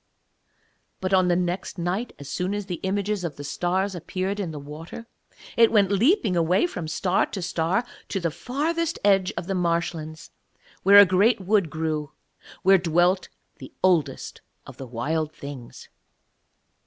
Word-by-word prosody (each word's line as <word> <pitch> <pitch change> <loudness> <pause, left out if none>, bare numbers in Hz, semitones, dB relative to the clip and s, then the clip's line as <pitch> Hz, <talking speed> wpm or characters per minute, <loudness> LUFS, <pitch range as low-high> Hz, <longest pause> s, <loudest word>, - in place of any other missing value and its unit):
But 190 +1 -2
on 185 -1 +4
the 175 - +3
next 180 +2 -2
night, 180 +7 -2
as 140 - -10
soon 180 +7 -2
as 205 -1 -4
the 180 -3 -5
images 200 +1 -1
of 165 -5 -4
the 145 - -8
stars 185 +6 -1
appeared 185 +3 -3
in 190 -4 -2
the 155 - -7
water, 150 +10 -9 0.5
it 230 -1 +5
went 205 -3 +3
leaping 220 - +3
away 175 - +2
from 175 - -5
star 180 +4 +1
to 200 - -6
star 175 +5 0 0.2
to 195 - -1
the 170 -2 -1
farthest 325 - -2
edge 195 -2 +4
of - - -3
the 195 - -2
marshlands, 170 -3 -2 0.5
where 200 +2 +7
a 205 - +11
great 195 +6 +3
wood 195 -2 +1
grew 155 -2 -3 0.5
where 195 0 +6
dwelt 175 +2 +2 0.3
the - - -11
Oldest 160 -8 +1 0.2
of - - -12
the 135 - -8
Wild 150 +7 -2
Things. 140 -4 -10
180 Hz, 160 wpm, -24 LUFS, 160-200 Hz, 0.5 s, a